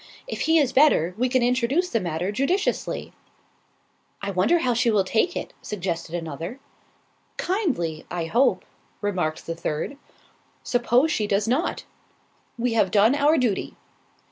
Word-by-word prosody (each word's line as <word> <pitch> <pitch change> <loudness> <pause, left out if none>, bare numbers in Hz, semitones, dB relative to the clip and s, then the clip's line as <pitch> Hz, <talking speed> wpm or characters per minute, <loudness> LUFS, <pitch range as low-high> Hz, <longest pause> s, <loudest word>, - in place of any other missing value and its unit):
"If - - -5
he 325 - +6
is 280 -5 +2
better, 260 - +4
we 250 +3 0
can 255 -1 +2
introduce 255 +8 +1
the 230 - +2
matter 175 +1 -2
judiciously." 275 - -1 1.1
"I 200 - -3
wonder 190 - +3
how 255 -7 +1
she 240 +1 +2
will 210 -3 +3
take 225 - 0
it?" - - -6
suggested 175 -4 -4
another. 165 - -5 0.8
"Kindly, 260 - -1
I 175 -2 -3
hope," 235 +11 +2 0.4
remarked 180 -6 -2
the 165 - -3
third. 165 - -4 0.7
"Suppose 245 +5 +2
she 215 -7 0
does 205 +1 +1
not?" 260 +9 0 0.7
"We 240 0 0
have 215 -4 +3
done 210 +5 +4
our 290 +2 +3
duty." 240 -8 -1
230 Hz, 140 wpm, -24 LUFS, 180-270 Hz, 1.1 s, he